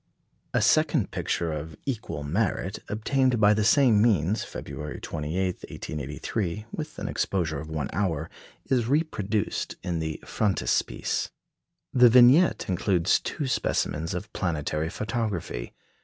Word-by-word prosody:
A - - +2
second - - +3
picture 85 -2 -1
of 75 0 -6
equal 110 - -3
merit, 95 +5 -1
obtained 125 +3 +1
by 105 0 +6
the 105 0 +1
same 115 -2 +5
means, 105 -3 +2
February 75 -2 -7
28, 85 +4 -2
1883, 85 +8 -4
with 155 0 -6
an - - -4
exposure 80 -6 -1
of 75 +2 -8
one 75 -3 -2
hour, 90 -4 -1 0.4
is 125 -4 +1
reproduced 115 - -1
in 90 -2 -2
the 80 -1 -3
frontispiece. 105 -4 0 0.6
The 125 -1 +7
vignette 125 +8 +6
includes 90 -1 +2
two 150 - -4
specimens 80 - -1
of 105 +4 -6
planetary 80 -3 -1
photography. 105 - -3
95 Hz, 125 wpm, -26 LUFS, 80-115 Hz, 0.6 s, The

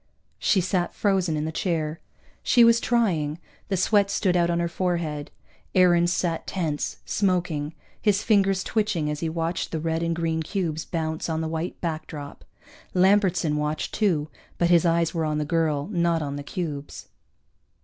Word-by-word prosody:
_ - - -44 0.4
She 190 - +3
sat 180 -1 -1
frozen 190 -6 +1
in 150 - -1
the 160 - -2
chair. 160 -2 -2 0.4
She 240 - +5
was 230 0 +6
trying; 175 -12 +1 0.3
the 195 - -1
sweat 200 +2 +3
stood 185 -2 +1
out 170 -1 +3
on 170 0 +1
her 170 - +1
forehead. 170 -4 -2 0.5
Aarons 175 -2 +5
sat 170 -2 -1
tense, 160 -6 -2
smoking, 170 -6 0 0.3
his 205 -1 +2
fingers 195 -3 +3
twitching 205 -9 0
as 150 - -4
he 165 - -1
watched 165 +1 -2
the 160 - -2
red 160 +1 -1
and 170 0 0
green 165 -1 -1
cubes 160 -2 -2
bounce 160 -1 -3
on 160 0 -1
the 160 - -2
white 160 +2 -4
backdrop. 155 -3 -5 0.5
Lambertson 185 -5 +3
watched 150 +1 -2
too, 170 -9 +1 0.3
but 175 0 +2
his 170 0 +5
eyes 170 0 +2
were 165 -2 -1
on 155 -1 0
the 150 - -1
girl, 155 -3 0
not 170 -3 +1
on 140 -1 -4
the 145 - -4
cubes. 145 -2 -5
170 Hz, 170 wpm, -25 LUFS, 155-185 Hz, 0.5 s, was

